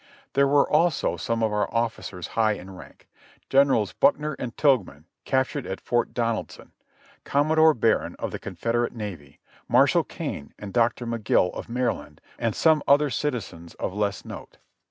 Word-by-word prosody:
There 140 0 +4
were 140 0 +4
also 160 0 +2
some 115 -2 -2
of 110 -1 +1
our 105 0 0
officers 115 -6 -3
high 110 -1 +2
in 95 -1 -9
rank, 90 - -14 0.4
Generals 135 -7 +3
Buckner 150 +1 +2
and 120 -3 -6
Tilghman, 100 - +1 0.2
captured 130 +1 0
at 95 - -4
Fort 120 0 0
Donaldson; 115 -2 -3 0.5
Commodore 155 +2 +3
Barron, 115 0 +1
of - - -4
the - - -5
Confederate 120 +1 -2
Navy; 90 -11 -8 0.3
Mar - - +5
shall - - +2
Kane, 70 - -6
and 100 -2 -8
Doctor 120 0 +1
Magill, 115 -5 +1
of - - -7
Maryland, 115 -12 -2 0.2
and 115 -3 -1
some 160 -2 +4
other 145 +1 +5
citi 145 +2 -1
zens 85 -7 -9
of - - -4
less 100 -1 -2
note. - - -10
115 Hz, 160 wpm, -25 LUFS, 105-140 Hz, 0.5 s, Mar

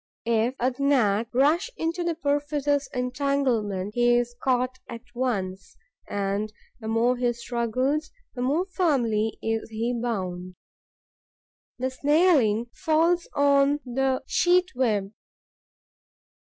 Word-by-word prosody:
If 230 +2 +1
a 255 +1 +1
Gnat 230 -6 +2
rush 295 - +2
into 330 +2 -2
the 340 -1 -1
perfidious 290 -2 0
entanglement, 250 -7 -1
he 240 0 +3
is 240 0 -1
caught 255 0 0
at 230 0 -8
once; 195 -7 -3 0.3
and 200 +1 -2 0.3
the 220 - -7
more 235 +3 +2
he 245 -1 +1
struggles 245 +6 -1 0.2
the 245 - -5
more 290 +8 +1
firmly 245 - 0
is 225 0 -2
he 225 +2 -2
bound. 185 -7 -3 1.2
The 260 +1 -2
snareling 265 - +2
falls 335 +2 +1
on 280 0 +3
the 260 +1 0
sheet 360 +1 +2
web. 215 -6 0
250 Hz, 110 wpm, -25 LUFS, 225-285 Hz, 1.2 s, he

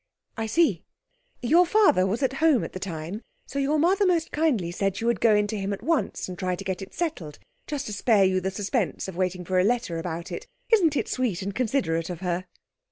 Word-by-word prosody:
'I 225 -1 -3
see. 330 +10 +2 0.6
Your 330 +9 +5
father 355 - +4
was 220 +8 -1
at 265 0 +1
home 315 -7 +4
at - - -6
the 185 - -5
time, 180 +2 -5 0.2
so 280 - -4
your 280 +3 +1
mother 370 +6 +3
most 350 -4 +1
kindly 260 - +1
said 195 +1 -1
she 230 - -3
would 235 -4 +1
go 220 -2 +5
in 210 0 +3
to 205 0 -3
him 195 +1 -2
at 200 - -7
once, 330 -3 0
and 180 -1 -8
try 185 -1 -1
to 195 - -8
get 190 -1 -3
it 195 - -8
settled, 240 - -4 0.3
just 290 -3 -3
to 210 - -5
spare 210 -1 +3
you 185 0 +2
the 190 - -1
suspense 205 +1 -2
of 190 - -7
waiting 180 0 -2
for 185 +1 +1
a - - +4
letter 215 -6 0
about 170 0 -5
it. - - -6 0.2
Isn't 345 -9 +4
it - - -1
sweet 220 -8 -1
and 200 +1 -3
considerate 190 -10 0
of 175 -1 -6
her?' 180 0 -2
205 Hz, 230 wpm, -26 LUFS, 185-275 Hz, 0.6 s, Your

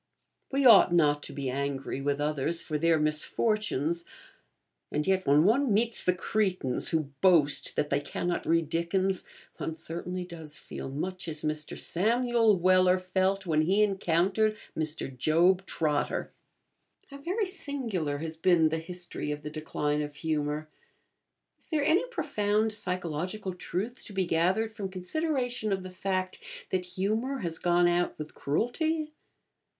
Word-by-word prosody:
We 275 0 +1
ought 215 -7 +8
not 150 -4 +3
to - - -6
be 135 -2 -3
angry 135 0 -3
with 140 +1 0
others 150 +3 0
for 150 -2 -2
their 165 +1 +3
misfortunes; 165 - 0 0.9
and 150 - -1
yet 190 -1 +1
when 145 +2 +5
one 240 +6 +3
meets 225 +3 +2
the 180 - +3
crétins 185 - 0
who 155 -4 -1
boast 165 -7 +4
that 150 - -1
they 140 - +3
cannot 175 +4 -3
read 165 -1 +2
Dickens, 180 +4 0 0.3
one 160 - -4
certainly 175 +3 -5
does 160 -4 -8
feel - - -7
much 180 +6 -4
as 155 -1 -3
Mr. 155 0 -3
Samuel 230 +2 +2
Weller 185 +1 +4
felt 190 +1 0
when 155 -3 +2
he 195 +6 +3
encountered 195 +2 +1 0.2
Mr. 155 -4 -2
Job 175 +7 +3
Trotter. 150 -3 -1 0.8
How 280 - -9
very 375 +9 -1
singular 245 - -3
has 160 +2 -5
been 165 -1 +4
the 160 +1 -1
history 175 -2 -4
of 150 0 -4
the 150 - -5
decline 150 -1 -2
of 145 -1 -5
humour. 150 -1 -2 0.9
Is - - -12
there 300 -3 0
any 360 +10 +3
profound 215 - 0
psychological 185 0 -3
truth 200 +7 -4
to 205 - -9
be 190 -1 0
gathered 185 +7 +1
from 200 -3 -5
consideration 245 - -2
of 190 -1 -1
the 185 - -8
fact 185 0 -2 0.3
that 185 -1 0
humour 220 +8 0
has 165 -3 -3
gone 175 0 +3
out 175 0 +1
with 150 0 -7
cruelty? 305 - -1
180 Hz, 150 wpm, -29 LUFS, 155-210 Hz, 0.9 s, ought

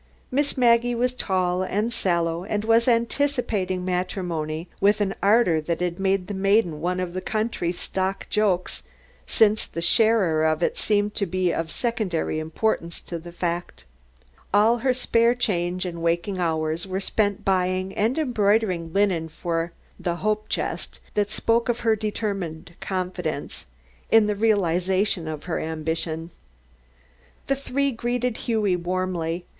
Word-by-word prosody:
Miss 285 +2 0
Maggie 240 -1 +4
was 250 +1 +1
tall 185 -6 0
and 210 +5 -1
sallow 170 -3 0
and 205 +2 -2
was 230 +2 +4
anticipating 230 -6 +1
matrimony 175 -3 -2
with 205 +2 +4
an 200 -2 0
ardor 200 -6 +4
that 165 +2 -2
had 180 0 -2
made 195 -1 +1
the 205 - -5
maiden 190 -5 +2
one 180 +2 -1
of 180 -1 -3
the 185 - -3
country's 215 -6 -2
stock 190 +1 -2
jokes, 200 -4 0 0.5
since 215 -1 +3
the - - -6
sharer 190 -4 +3
of 155 +1 +1
it - - +1
seemed 205 -1 +1
to 200 - -1
be 185 0 0
of 165 -1 -2
secondary 215 -10 -1
importance 170 +2 -1
to 170 - -6
the 170 +1 -10
fact. 170 - -3 0.7
All 220 +4 +4
her 260 +2 +2
spare 240 -1 +2
change 180 -6 -1
and 170 -2 -5
waking 170 +3 0
hours 160 0 -1
were 190 0 -2
spent 205 0 0
buying 185 0 +1
and 225 +7 +1
embroidering 210 - +1
linen 185 -5 +1
for 165 +1 -2 0.3
the 175 -2 -1
"hope 215 +3 -1
chest" - - -3
that 205 -1 +1
spoke 230 +2 +1
of 240 0 0
her 225 -1 +3
determined 200 -7 -4
confidence 180 -5 -3 0.4
in 225 -1 +6
the 210 - +1
realization 190 -3 +1
of 155 -1 -5
her 175 - -2
ambition. 160 +1 -3 1.1
The 275 - +1
three 275 +1 -1
greeted 245 0 -1
Hughie 215 -5 +1
warmly. 175 -1 -2
190 Hz, 145 wpm, -24 LUFS, 170-220 Hz, 1.1 s, in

